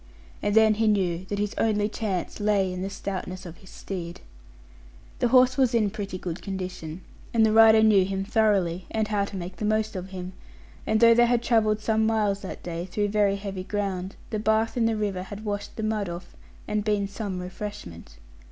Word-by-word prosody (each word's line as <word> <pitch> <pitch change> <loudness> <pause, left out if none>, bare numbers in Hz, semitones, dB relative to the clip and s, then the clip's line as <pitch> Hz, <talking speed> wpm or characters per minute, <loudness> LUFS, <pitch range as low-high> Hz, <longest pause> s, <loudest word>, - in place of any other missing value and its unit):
And 205 0 0
then 220 -1 +6
he 220 +1 +1
knew 185 -4 +1
that 200 +2 -4
his 205 +1 -1
only 210 -2 +2
chance 205 -5 -3
lay 200 -3 +1
in 180 - -5
the 195 - -3
stoutness 190 -1 -5
of 170 -1 -9
his 190 - -16
steed. 175 -3 -7 1.0
The 245 - +3
horse 255 +1 +5
was 255 -3 +3
in 215 -3 +2
pretty 195 -2 -5
good 180 -1 -5
condition; 185 -4 -6 0.3
and 225 -1 +5
the 220 - +3
rider 220 0 +7
knew 210 -3 +6
him 195 +1 -2
thoroughly, 195 -5 +1
and 220 -1 -1
how 205 -2 +1
to 200 - -9
make 180 +1 -7
the - - -5
most 215 0 0
of 185 0 -5
him; 185 -1 -7 0.5
and 220 +1 +2
though 230 0 +8
they 240 +1 +5
had 240 0 +1
travelled 215 -3 +2
some 220 0 +1
miles 210 -3 +1
that 190 - -8
day 170 0 -4
through 205 +2 -1
very 205 -1 +2
heavy 195 -2 -5
ground, 195 -1 -3 0.2
the 215 - -1
bath 220 +1 +1
in 235 -2 +2
the 225 -1 0
river 200 -3 -2
had 205 +3 -8
washed 205 -1 -4
the 220 - -4
mud 215 -3 -1
off, 170 +1 -8 0.3
and 210 0 -1
been 205 -2 0
some 200 -2 -5
refreshment. 180 - -8
205 Hz, 205 wpm, -26 LUFS, 185-220 Hz, 1.0 s, though